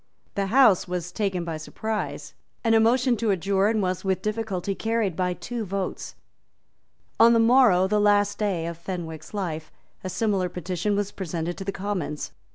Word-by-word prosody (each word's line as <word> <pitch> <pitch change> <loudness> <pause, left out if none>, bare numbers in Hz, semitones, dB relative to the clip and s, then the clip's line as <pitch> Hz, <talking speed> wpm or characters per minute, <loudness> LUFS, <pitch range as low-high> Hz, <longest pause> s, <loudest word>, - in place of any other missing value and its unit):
The 200 -1 -1
House 225 -4 +5
was 175 -1 -4
taken 190 -4 -1
by 165 -2 -3
surprise; 155 -4 -4 0.3
and 225 -1 +3
a 225 - +6
motion 245 +3 +3
to 225 0 0
adjourn 200 +3 +2
was 185 -1 -1
with 190 -1 -1
difficulty 210 -3 -2
carried 220 -3 -1
by 180 0 0
two 240 +2 -5
votes. 195 -1 -4 1.0
On 230 +1 +7
the 230 - +4
morrow, 225 -6 +5
the 210 +2 +1
last 205 0 +3
day 195 -6 0
of 170 0 -5
Fenwick's 165 -3 -6
life, 165 -6 -4 0.3
a 185 - -3
similar 190 -1 0
petition 180 +3 -2
was 205 0 -1
presented 175 -2 -4
to - - -4
the 195 - -2
Commons. 185 -6 -4
195 Hz, 165 wpm, -25 LUFS, 175-215 Hz, 1.0 s, On